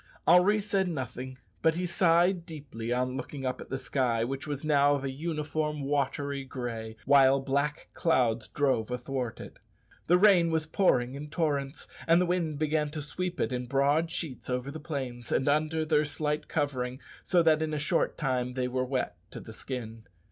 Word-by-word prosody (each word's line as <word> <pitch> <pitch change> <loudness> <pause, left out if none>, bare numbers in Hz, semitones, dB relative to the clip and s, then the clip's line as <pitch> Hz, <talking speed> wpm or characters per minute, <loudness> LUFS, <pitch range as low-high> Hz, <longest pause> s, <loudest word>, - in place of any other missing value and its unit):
Henri 195 +4 +6
said 200 -2 0
nothing, 130 -4 -5 0.2
but 160 0 +3
he 180 +1 -1
sighed 175 +1 +3
deeply 140 -9 -7
on 125 +1 0
looking 135 +1 -6
up 130 - -2
at - - -10
the 135 - -2
sky, 125 -3 0
which 135 +4 -4
was 145 0 -4
now 145 -1 +4
of 140 - -4
a 135 - -2
uniform 150 0 -2
watery 140 0 -1
gray, 120 -4 -5
while 135 0 +6
black 140 +3 -1
clouds 120 -8 +1
drove 130 -6 0
athwart 125 -1 -3
it. - - -10 0.5
The 175 - +6
rain 180 -4 +5
was 160 -1 0
pouring 135 -8 +2
in 145 +2 -7
torrents, 145 -3 -1 0.2
and 165 +1 +6
the 180 - +3
wind 170 -4 -1
began 150 0 0
to 155 +1 -5
sweep 180 +4 -4
it - - 0
in 125 0 -3
broad 140 +5 +2
sheets 150 -7 -5
over 125 +2 -2
the 155 - -7
plains, 130 -6 -5
and 135 - +1
under 155 +2 +1
their 155 -1 +3
slight 150 0 -2
covering, 130 -4 -2 0.2
so 175 -2 +3
that 160 -1 +4
in 160 -1 -1
a 150 - -1
short 155 +4 0
time 125 -4 -1
they 130 -1 0
were 130 +1 -1
wet 130 -8 -2
to - - -8
the 110 - -10
skin. 115 -2 -7
145 Hz, 185 wpm, -29 LUFS, 130-160 Hz, 0.5 s, Henri